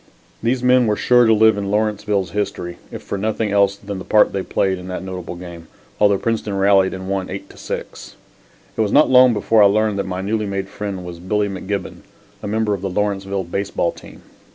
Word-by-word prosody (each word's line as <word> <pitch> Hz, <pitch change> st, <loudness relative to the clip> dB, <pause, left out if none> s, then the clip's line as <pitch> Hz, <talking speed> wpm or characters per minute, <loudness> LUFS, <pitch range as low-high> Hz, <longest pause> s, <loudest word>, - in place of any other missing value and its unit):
These 120 Hz, +2 st, 0 dB
men 125 Hz, -1 st, +4 dB
were 105 Hz, -, +2 dB
sure 120 Hz, +2 st, +4 dB
to 110 Hz, -, +5 dB
live 110 Hz, -1 st, +4 dB
in 100 Hz, -1 st, -3 dB
Lawrenceville's 105 Hz, -3 st, 0 dB
history 90 Hz, -3 st, -4 dB
if -, -, -8 dB
for 100 Hz, -, -4 dB
nothing 110 Hz, 0 st, -1 dB
else 100 Hz, -1 st, +3 dB
than 100 Hz, -1 st, -7 dB
the -, -, -7 dB
part 105 Hz, -, +3 dB
they 100 Hz, -, -1 dB
had -, -, -7 dB
played 95 Hz, -1 st, 0 dB
in 90 Hz, -, -9 dB
that 90 Hz, 0 st, -5 dB
notable 90 Hz, -2 st, -6 dB
game, 85 Hz, -2 st, -10 dB, 0.3 s
although 100 Hz, -1 st, +4 dB
Princeton 110 Hz, -2 st, -2 dB
rallied 95 Hz, -1 st, +3 dB
and 95 Hz, 0 st, -7 dB
won 95 Hz, -1 st, -2 dB
8 95 Hz, +1 st, -6 dB
to -, -, -17 dB
6. -, -, -7 dB, 0.6 s
It -, -, +1 dB
was 105 Hz, -2 st, 0 dB
not 150 Hz, -, +5 dB
long 130 Hz, -1 st, +7 dB
before 110 Hz, 0 st, +2 dB
I 100 Hz, -, +8 dB
learned 105 Hz, 0 st, +1 dB
that 100 Hz, -, -2 dB
my 90 Hz, 0 st, -3 dB
newly 105 Hz, +2 st, -1 dB
made 100 Hz, -1 st, -3 dB
friend 100 Hz, -3 st, -5 dB
was 85 Hz, -1 st, -8 dB
Billy 105 Hz, +3 st, 0 dB
McGibbon, 100 Hz, +1 st, -4 dB, 0.4 s
a -, -, -5 dB
member 110 Hz, 0 st, 0 dB
of 100 Hz, -, -4 dB
the 95 Hz, -, -2 dB
Lawrenceville 100 Hz, 0 st, -2 dB
baseball 90 Hz, -1 st, -2 dB
team. -, -, -14 dB
100 Hz, 220 wpm, -20 LUFS, 95-105 Hz, 0.6 s, I